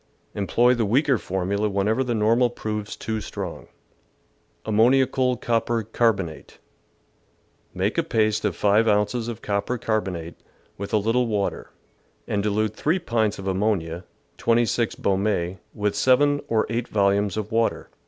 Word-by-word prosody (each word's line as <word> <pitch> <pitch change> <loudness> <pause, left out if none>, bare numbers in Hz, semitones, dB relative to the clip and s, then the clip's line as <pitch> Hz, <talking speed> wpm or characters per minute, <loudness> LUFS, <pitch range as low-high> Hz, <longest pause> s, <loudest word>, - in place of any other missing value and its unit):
Employ 120 +5 +3
the 120 -2 0
weaker 130 +4 +2
formula 100 +3 -1
whenever 105 +6 +1
the 120 -2 -1
normal 115 +3 +3
proves 105 -3 -5
too 110 -1 -4
strong. 90 - -6 1.0
Ammoniacal 125 +3 +3
Copper 115 -1 0
Carbonate. 100 -7 -1 0.6
— - - -40
Make - - 0
a - - +2
paste 110 -1 +1
of 105 -5 0
5 105 +4 +3
ounces 105 +3 +1
of 115 -1 -6
copper 100 +4 -1
carbonate 95 -8 -3 0.4
with 100 0 -6
a 110 - +3
little 115 +4 +1
water, 105 -3 -2 0.6
and 100 - 0
dilute 105 +1 0
3 160 +5 +1
pints 115 - 0
of 95 - -8
ammonia 95 -3 -1 0.4
(26 115 0 +1
Beaume) 95 -2 -1 0.2
with 105 -1 -1
7 145 +6 +3
or 110 -1 +1
8 115 +2 -2
volumes 100 0 +1
of 110 +1 -4
water. 115 0 0
110 Hz, 140 wpm, -24 LUFS, 100-120 Hz, 1.0 s, Employ